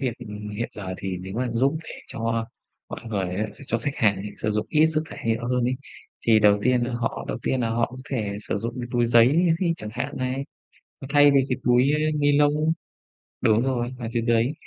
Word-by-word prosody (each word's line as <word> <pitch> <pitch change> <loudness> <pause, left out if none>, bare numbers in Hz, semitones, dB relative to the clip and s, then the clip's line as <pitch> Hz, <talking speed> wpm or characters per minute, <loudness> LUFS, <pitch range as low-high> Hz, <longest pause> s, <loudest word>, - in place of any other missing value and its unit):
việc, 130 -4 0
ừm, 105 -3 -7
hiện 105 +3 -3
giờ 95 -3 -6
thì 95 -1 -4
nếu 95 +1 -7
mà 125 0 0
giúp 135 +6 +2 0.3
cho 115 0 -2 0.4
mọi - - -6
người 100 -4 -1
á, 110 +1 0
s - - -18
cho 115 - 0
khách 140 +5 -3
hàng 105 -3 +3
này 100 +2 -6
sử 110 - -2
dụng 105 0 -1
ít 155 0 +4
rác 155 -1 0
thải - - -10
nhựa 115 +2 -1
hơn 125 -1 +1
ấy, 125 +1 0 0.5
thì 110 -2 +6
đầu 105 -1 +5
tiên 125 0 +3
là 120 0 -2
họ 120 -1 -2
đầu - - -3
tiên 130 - 0
là 115 -1 0
họ 115 0 +1
có 130 - -10
thể 105 -6 -2
sử 105 - -3
dụng 115 +3 -4
cái 120 - -5
túi 120 -1 +2
giấy 125 +10 +5
thi 170 -3 +2
chẳng 105 -6 -7
hạn 125 +4 -4
này, 130 +2 -2 0.6
à, 135 - -7
thay 145 -1 +7
vì 140 -1 +5
cái 125 - 0
túi 125 +3 +4 0.3
ni 145 0 +3
lông. 150 +2 +3 0.7
Đúng 110 +1 +4
rồi, 125 -2 -1
à, 115 - -4
chính 115 -1 -1
cái 120 - +4
đấy, 120 +5 +2
120 Hz, 235 wpm, -24 LUFS, 110-135 Hz, 0.7 s, thay